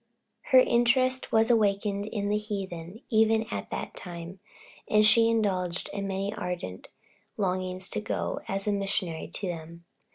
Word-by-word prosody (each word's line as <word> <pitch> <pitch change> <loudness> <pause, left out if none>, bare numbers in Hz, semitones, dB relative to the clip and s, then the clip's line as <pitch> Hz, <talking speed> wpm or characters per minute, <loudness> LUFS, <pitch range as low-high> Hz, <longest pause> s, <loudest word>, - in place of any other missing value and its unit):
Her 260 - +5
interest 255 +1 +3
was 225 +2 +4
awakened 205 -2 +1
in 205 -2 -2
the 210 - +2
heathen, 195 -2 -6
even 220 0 +4
at - - -4
that - - -4
time, 175 +1 -8 0.5
and 215 0 +4
she 225 +2 +6
indulged 185 -6 0
in 200 -1 -3
many 195 +1 -2
ardent 175 - -5 0.5
longings 185 -1 -1
to - - -1
go - - -2
as 195 0 -2
a 210 - +1
missionary 195 -4 -2
to 185 +5 -5
them. 170 0 -7
200 Hz, 150 wpm, -28 LUFS, 180-220 Hz, 0.5 s, she